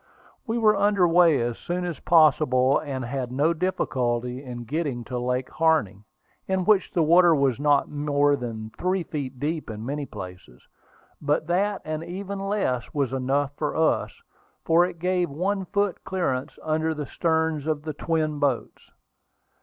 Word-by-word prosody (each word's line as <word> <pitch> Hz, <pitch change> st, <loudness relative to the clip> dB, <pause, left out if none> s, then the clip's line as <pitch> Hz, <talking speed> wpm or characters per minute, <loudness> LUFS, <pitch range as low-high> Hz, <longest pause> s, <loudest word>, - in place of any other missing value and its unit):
We 225 Hz, +1 st, -1 dB
were 215 Hz, -2 st, +4 dB
under 200 Hz, -2 st, +3 dB
way 170 Hz, -3 st, +5 dB
as 120 Hz, -1 st, -3 dB
soon 180 Hz, +1 st, -3 dB
as 175 Hz, -3 st, -4 dB
possible, 150 Hz, -5 st, +4 dB
and 135 Hz, -4 st, -4 dB
had 125 Hz, 0 st, -4 dB
no 145 Hz, +6 st, +2 dB
difficulty 125 Hz, -8 st, -1 dB
in 120 Hz, -2 st, -7 dB
getting 140 Hz, -2 st, -3 dB
to 125 Hz, +1 st, -4 dB
Lake 125 Hz, +1 st, -2 dB
Harney, 155 Hz, -12 st, +1 dB, 0.4 s
in 190 Hz, -1 st, 0 dB
which 205 Hz, -2 st, +3 dB
the 170 Hz, -, +2 dB
water 170 Hz, +1 st, +6 dB
was 135 Hz, -3 st, +1 dB
not 145 Hz, -1 st, +3 dB
more 145 Hz, -1 st, +1 dB
than 110 Hz, -4 st, -6 dB
three 185 Hz, 0 st, 0 dB
feet 135 Hz, -5 st, -5 dB
deep 155 Hz, +1 st, -3 dB
in 110 Hz, 0 st, -6 dB
many 145 Hz, +2 st, -3 dB
places. 90 Hz, -9 st, -10 dB, 0.6 s
But 150 Hz, +1 st, 0 dB
that, 195 Hz, +4 st, 0 dB
and 155 Hz, +1 st, -3 dB
even 195 Hz, +3 st, -5 dB
less, 195 Hz, -, -1 dB
was 140 Hz, -3 st, 0 dB
enough 135 Hz, +2 st, 0 dB
for 150 Hz, -2 st, -2 dB
us, 160 Hz, 0 st, +1 dB, 0.5 s
for 170 Hz, +2 st, +5 dB
it 180 Hz, -, -6 dB
gave 180 Hz, +1 st, 0 dB
one 190 Hz, +6 st, -2 dB
foot 200 Hz, 0 st, -1 dB
clear 140 Hz, -9 st, -1 dB, 0.2 s
under 160 Hz, +1 st, 0 dB
the 150 Hz, -1 st, -4 dB
sterns 160 Hz, -1 st, 0 dB
of 155 Hz, -2 st, -1 dB
the 155 Hz, -1 st, -4 dB
twin 155 Hz, -1 st, -1 dB
boats. 140 Hz, -5 st, -1 dB
150 Hz, 160 wpm, -25 LUFS, 130-175 Hz, 0.6 s, water